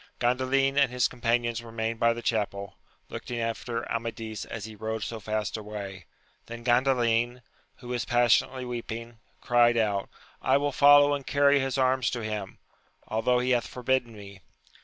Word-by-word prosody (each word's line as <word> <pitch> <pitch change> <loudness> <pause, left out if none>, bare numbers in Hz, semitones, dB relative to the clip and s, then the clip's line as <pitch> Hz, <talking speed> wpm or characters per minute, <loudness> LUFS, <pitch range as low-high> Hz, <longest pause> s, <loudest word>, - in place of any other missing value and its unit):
ANDALIN 130 +3 +2
and 140 -2 +4
his 125 0 +2
companions 120 -1 -1
remained 115 -1 -4
by 115 - +4
the 115 0 -5
chapel, 100 -3 -2 0.3
looking 120 -1 -5
after 115 +1 -3
Amadis 115 -1 -4
as 110 -3 -6
he 110 -1 -9
rode 110 0 -4
80 115 - -5
fast 110 0 -2
away: 100 -3 -7 0.4
then 120 0 -8
Gandalin, 120 -1 +2 0.3
who 125 - -12
was 125 -1 -1
pas 120 -1 +4
sionately 130 0 0
weeping, 115 -1 -6 0.2
cried 120 -1 +4
out, 105 -3 0 0.3
I 130 +1 +3
will 145 0 0
follow 145 +1 +6
and 140 -2 -4
carry 140 0 +4
his 135 0 -1
arms 130 -2 +2
to 120 -2 -4
him, 105 -3 -5 0.5
although 115 +3 +1
he 125 +1 0
hath 120 -2 +1
forbidden 125 -1 -1
me! 100 -2 -12
120 Hz, 160 wpm, -27 LUFS, 110-125 Hz, 0.5 s, follow